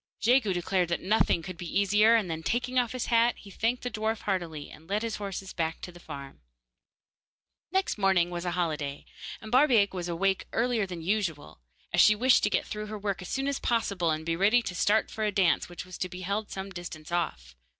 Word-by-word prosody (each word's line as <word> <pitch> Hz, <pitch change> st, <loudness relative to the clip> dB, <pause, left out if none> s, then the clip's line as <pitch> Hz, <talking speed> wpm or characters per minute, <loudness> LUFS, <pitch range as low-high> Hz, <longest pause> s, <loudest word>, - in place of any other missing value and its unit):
Jegu 230 Hz, -1 st, +3 dB
declared 180 Hz, 0 st, 0 dB
that 170 Hz, -, -2 dB
nothing 190 Hz, -4 st, +2 dB
could 185 Hz, -1 st, -7 dB
be 175 Hz, +2 st, -1 dB
easier, 210 Hz, +3 st, +5 dB
and 220 Hz, -5 st, +2 dB
then 160 Hz, -1 st, -4 dB
taking 250 Hz, +7 st, 0 dB
off 240 Hz, -2 st, 0 dB
his 255 Hz, -, -2 dB
hat, 230 Hz, +1 st, +4 dB
he 200 Hz, -, -13 dB
thanked 230 Hz, +5 st, -1 dB
the 245 Hz, -, -3 dB
dwarf 220 Hz, 0 st, -2 dB
heartily, 170 Hz, -7 st, -3 dB
and 160 Hz, +2 st, -15 dB
led 210 Hz, +3 st, 0 dB
his 225 Hz, -2 st, -2 dB
horses 195 Hz, -1 st, -5 dB
back 165 Hz, -1 st, -2 dB
to 180 Hz, -, -7 dB
the 175 Hz, -, -14 dB
farm. 140 Hz, -4 st, -9 dB, 1.3 s
Next 380 Hz, -, 0 dB
morning 190 Hz, -3 st, +3 dB
was 175 Hz, -1 st, -4 dB
a 175 Hz, -1 st, -2 dB
holiday, 150 Hz, -5 st, -2 dB, 0.4 s
and 220 Hz, -, -9 dB
Barbaik 245 Hz, -7 st, +4 dB
was 175 Hz, -2 st, -4 dB
awake 190 Hz, +3 st, 0 dB
earlier 230 Hz, -3 st, +1 dB
than 175 Hz, -3 st, -7 dB
usual, 165 Hz, -, -2 dB, 0.3 s
as -, -, +5 dB
she 215 Hz, -, +7 dB
wished 250 Hz, +3 st, +4 dB
to 210 Hz, -, +2 dB
get -, -, 0 dB
through 210 Hz, 0 st, -5 dB
her 215 Hz, 0 st, -5 dB
work 200 Hz, -2 st, -3 dB
as 180 Hz, -, -8 dB
soon 270 Hz, +1 st, -1 dB
as 280 Hz, -1 st, -1 dB
possible, 200 Hz, -7 st, 0 dB
and 155 Hz, 0 st, -1 dB
be 165 Hz, 0 st, 0 dB
ready 210 Hz, +7 st, +4 dB
to 180 Hz, -, -4 dB
start 205 Hz, +4 st, +2 dB
for 220 Hz, -, -3 dB
a 210 Hz, -, +1 dB
dance 190 Hz, -4 st, +2 dB
which 175 Hz, +1 st, -7 dB
was 185 Hz, -1 st, -10 dB
to 185 Hz, -, -2 dB
be 180 Hz, 0 st, -8 dB
held 200 Hz, +3 st, -2 dB
some 195 Hz, 0 st, -6 dB
distance 175 Hz, -3 st, -8 dB
off. 65 Hz, -, -2 dB
195 Hz, 220 wpm, -28 LUFS, 175-220 Hz, 1.3 s, she